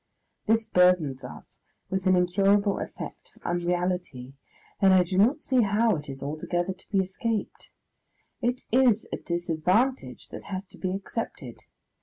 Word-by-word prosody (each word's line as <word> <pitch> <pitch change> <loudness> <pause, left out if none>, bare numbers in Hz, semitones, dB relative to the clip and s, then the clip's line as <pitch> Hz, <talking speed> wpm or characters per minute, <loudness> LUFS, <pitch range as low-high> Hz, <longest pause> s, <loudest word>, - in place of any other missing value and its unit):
This 225 +1 +3
burthens 180 -9 +3
us 125 - -11 0.3
with 190 0 -1
an 185 - +5
incurable 195 +3 +2
effect - - -8
of - - -23
unreality, 175 -6 -2 0.5
and 190 -1 +6
I 185 - +6
do 180 +1 -4
not 245 +10 +3
see 260 -2 +2
how 215 +1 +2
it 150 -1 -9
is 135 0 -7
altogether 175 +5 -2
to 185 - -19
be 200 - 0
escaped. 210 +3 -3 0.7
It 245 +1 -1
is 240 -3 +4
a - - -1
disadvantage 180 +9 -1
that - - -9
has 190 0 -5
to - - -16
be 185 - -2
accepted. 200 +4 -6
185 Hz, 150 wpm, -27 LUFS, 175-215 Hz, 0.7 s, and